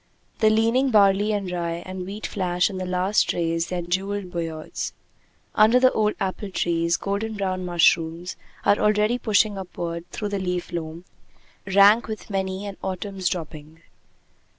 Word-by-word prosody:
The 220 - +5
leaning 230 +5 +2
barley 205 -1 +4
and 200 -3 -2
rye 170 -1 -3
and 185 -1 -6
wheat 205 +2 -6
flash 180 -1 0
in 190 - -5
the 185 - -4
last 185 +3 +1
rays 165 -1 -1
their 175 0 -3
jeweled 190 +2 -2
beards. 165 -3 -4 0.6
Under 220 +4 +5
the 255 0 +5
old 215 -1 +1
apple 195 +1 -3
trees, 170 -2 0
golden 210 +3 -3
brown 185 -2 -2
mushrooms 170 0 +2 0.3
are 205 - +4
already 210 +3 +2
pushing 210 -2 +2
upward 170 -2 -6
through 210 - -4
the 200 -1 -2
leaf 180 -2 -3
loam, 165 0 -5 0.6
rank 200 +4 +5
with 215 -1 -7
many 190 0 -2
an 200 -1 -7
autumn's 190 -1 -3
dropping. 160 -1 -7
190 Hz, 150 wpm, -24 LUFS, 175-205 Hz, 0.6 s, The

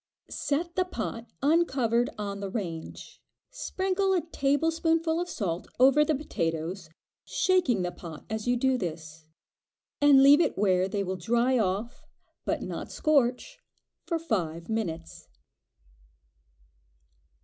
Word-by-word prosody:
Set 335 +4 -2
the 370 - +3
pot 230 -8 -5 0.2
uncovered 265 -7 +2
on 200 -1 -4
the 200 -1 -4
range; 175 -6 -6 0.3
sprinkle 380 +1 -1
a 360 - +2
tablespoonful 325 +3 +1
of 355 - -4
salt 180 - -3
over 270 +4 +6
the 305 0 +1
potatoes, 165 - -3 0.3
shaking 350 - +1
the 180 - -2
pot 165 -4 -10
as 220 +1 -4
you 245 0 +2
do 260 +1 +1
this, 155 -3 -6 0.7
and 280 -2 +7
leave 285 +4 +8
it - - 0
where 185 -2 +2
they 200 0 -1
will 185 0 -3
dry 240 +7 +2
off, 210 +4 -2 0.4
but - - -1
not - - -6
scorch, 290 - +1 0.5
for 335 - 0
five 170 - -3
minutes. 175 -7 -4
240 Hz, 125 wpm, -28 LUFS, 185-305 Hz, 0.7 s, leave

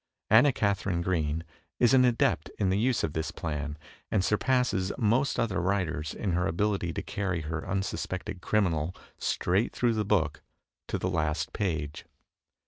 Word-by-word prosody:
Anna 120 +6 +7
Katharine 100 -6 0
Green 80 -3 0 0.4
is 120 -1 +5
an 130 -1 +6
adept 120 -2 +2
in 95 -2 +1
the 95 - +2
use 125 +1 +1
of 75 - -1
this 80 0 -2
plan, 75 -2 -4 0.3
and 95 -3 +1
surpasses 105 -4 +1
most 125 +4 +2
other 100 -6 0
writers 85 -5 -1
in 100 - -2
her 90 -1 +1
abihty 95 -1 0
to - - -3
carry 95 -4 -2
her 80 +1 -4
unsuspected 95 0 -3
criminal 90 -6 +1 0.2
straight 95 +6 +1
through 120 -2 +2
the 110 -1 0
book 95 -7 +1 0.5
to - - -1
the - - -2
last 80 -4 -1
page. 80 -7 -2
95 Hz, 155 wpm, -29 LUFS, 80-105 Hz, 0.5 s, Anna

